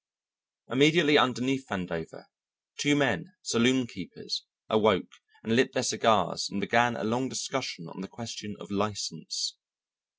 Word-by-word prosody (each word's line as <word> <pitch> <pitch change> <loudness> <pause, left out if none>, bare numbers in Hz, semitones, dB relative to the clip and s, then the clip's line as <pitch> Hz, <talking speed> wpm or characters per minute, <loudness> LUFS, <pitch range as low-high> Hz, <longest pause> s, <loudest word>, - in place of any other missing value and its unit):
Immediately 150 +3 +6
underneath 130 +2 +1
Vandover 90 -6 -6 0.5
two 145 0 +3
men, 145 - 0
saloonkeepers, 115 -7 0 0.3
awoke - - +2 0.3
and 115 - 0
lit 130 +2 +3
their - - 0
cigars - - +2
and 100 - -4
began 120 +3 +3
a - - -5
long 120 +4 -1
discussion 120 -6 -4
on 95 - -10
the 95 - -7
question 115 -3 -8
of - - -12
license. 100 0 -3
120 Hz, 125 wpm, -28 LUFS, 100-130 Hz, 0.5 s, Immediately